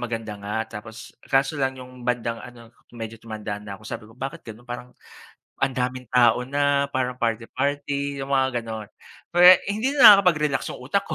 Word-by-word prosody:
maganda 115 -3 -4
nga 105 +2 -4 0.2
tapos 115 +2 -12 0.2
kaso 135 +2 +1
lang 130 0 0
'yong 125 0 -12
bandang 115 -1 -1
ano 120 -2 -13 0.2
medyo 115 -1 -8
tumanda 105 -2 -6
na 100 -1 -8
ako, - - -20
sabi 105 - -6
ko, 115 - -18
bakit 135 +6 -6
gano'n 115 +2 -12
parang 125 0 -7 0.7
ang 135 - +3
daming 125 -1 -3
tao 125 -1 +4
na 140 +1 +1
parang 125 -1 -1
party-party, 140 +4 -2
'yung 135 0 -6
mga 130 -2 +1
gano'n. 110 -2 -7 0.4
Pero, 180 +2 +9 0.2
hindi 230 +7 -1
na 210 -8 +10
nakakapag-relax 150 -7 +1
'yung - - -11
utak 170 +10 -1
ko. 155 - -4
125 Hz, 180 wpm, -24 LUFS, 115-140 Hz, 0.7 s, na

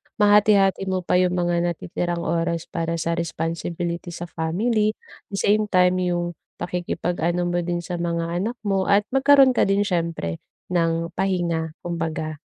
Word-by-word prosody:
mahati-hati 205 -2 +4
mo 185 -1 -1
pa 180 - +2
yung 180 -1 +2
mga 175 -1 +1
natitirang 175 0 -3
oras 165 0 -1
para 165 0 -2
sa 170 +1 -1
responsibility 170 +1 -3
sa 175 - -6
family, 210 +7 0 0.3
the 200 - -6
same 210 +2 +2
time 185 -2 +3
yung 175 -1 -1 0.2
pakikipag-ano 175 0 -2
mo 175 0 0
din 175 0 -2
sa 175 0 -4
mga 170 -1 -2
anak 195 +8 -2
mo 195 -2 0
at 200 +1 +4
magkaroon 270 0 +6
ka 250 - +2
din 195 +1 +2
syempre 170 - -2 0.3
ng 165 -1 0
pahinga, 170 -4 -1
kumbaga. 160 -2 -3
175 Hz, 150 wpm, -23 LUFS, 170-195 Hz, 0.3 s, magkaroon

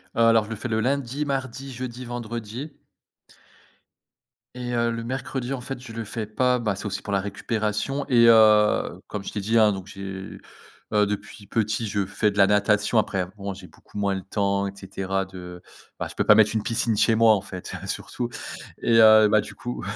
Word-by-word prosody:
Heu, - - -2
alors, 115 -1 +5
je - - -12
le 115 - -4
fais 120 - -4
le 110 -1 0
lundi, 135 +2 -1
mardi, 135 -1 -4
jeudi, 125 0 -6
vendredi 120 +3 -6 1.8
et, 125 -1 -4
heu, 115 0 +1
le 115 0 -4
mercredi, 130 +1 -3
en 125 - -4
fait, 135 0 -6
je 120 -3 -10
le 115 0 -4
fais 110 +1 -4
pas, 125 +4 +1
bah, 105 -4 -1
c'est 100 - -7
aussi 100 -1 -3
pour 100 - -5
la 100 - +2
récupération, 105 +6 -2
et, 120 -2 +6
heu, 110 -2 +5
comme 100 -2 -5
je - - -6
t'ai 105 - -3
dit, 110 +4 +1
hein, 110 -2 +6
donc 95 -1 -6
j'ai 95 -1 -7 0.6
heu, 105 -1 +4
depuis 105 0 -6
petit, 110 +1 -1
je 100 -1 -1
fais 105 +2 0
de 100 - -9
la 100 - +6
natation. 105 +2 +2
Après, 95 -4 +1
bon, 100 -1 -4
j'ai 95 -1 -12
beaucoup - - -15
moins 100 -1 +1
le 95 -1 -4
temps, 100 0 0
et 100 - -6
cetera, 95 0 -3
de, 90 -2 -10 0.4
bah, - - -2
je - - -10
peux - - 0
pas 105 - +7
mettre 110 0 +5
une 110 -2 -1
piscine 115 -1 0
chez 110 +1 +4
moi 115 0 +6
en 100 - 0
fait, 95 -2 -8
surtout 120 - -3 0.5
et, 115 - +3
heu, 110 -1 +8
bah, 110 - +4
du 105 0 -6
coup, 120 +4 -6
110 Hz, 210 wpm, -24 LUFS, 100-120 Hz, 1.8 s, heu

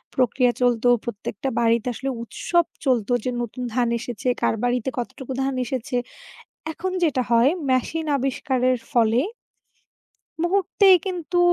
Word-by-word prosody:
প্রক্রিয়া 250 0 +3
চলতো। 245 -1 +2 0.2
প্রত্যেকটা 225 +2 -4
বাড়িতে 230 0 +2
আসলে 270 +3 -4
উৎসব 345 +8 0 0.2
চলতো 245 -3 +1
যে, - - -1
নতুন 240 +2 -5
ধান 245 -1 +2
এসেছে, 240 +1 -5
কার - - +2
বাড়িতে 245 0 0
কতটুকু 250 +2 -5
ধান 270 0 0
এসেছে। 260 +2 -3 0.8
এখন 370 +3 -4
যেটা 265 -6 +1
হয় 235 +3 +5 0.2
মেশিন 310 +5 0
আবিষ্কারের 255 -1 0
ফলে 230 0 +3 1.2
মুহূর্তেই 385 +1 +5
কিন্তু 355 -1 -2
255 Hz, 125 wpm, -23 LUFS, 235-280 Hz, 1.2 s, হয়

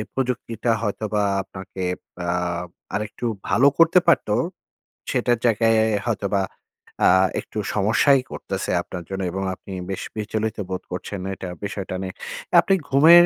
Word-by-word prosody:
প্রযুক্তিটা 120 -3 -1
হয়তোবা 105 -1 -1 0.2
আপনাকে 95 0 -8 0.4
আ - - -3 0.7
আরেকটু 105 +3 -3 0.2
ভালো 135 +4 +5
করতে 165 +2 +7
পারতো। 155 -10 +4 0.8
সেটার 120 -1 +2
জায়গায় 110 -1 +3
হয়তোবা 100 -3 0 0.6
আ - - +7 0.3
একটু - - -11 0.2
সমস্যাই 115 +7 +4
করতেছে - - -3
আপনার 90 -1 -7
জন্য 95 0 -3
এবং 95 +1 -3
আপনি 95 - -10 0.2
বেশ 95 - -3
বিচলিত 110 +1 -2
বোধ 95 -1 -3
করছেন 95 +2 -4 0.2
এটা 95 - -6 0.2
বিষয়টা 100 -2 -4
নিয়ে। 95 -1 -4 0.5
আপনি 195 - +3
ঘুমের 165 +6 +8
110 Hz, 125 wpm, -23 LUFS, 95-120 Hz, 0.8 s, ঘুমের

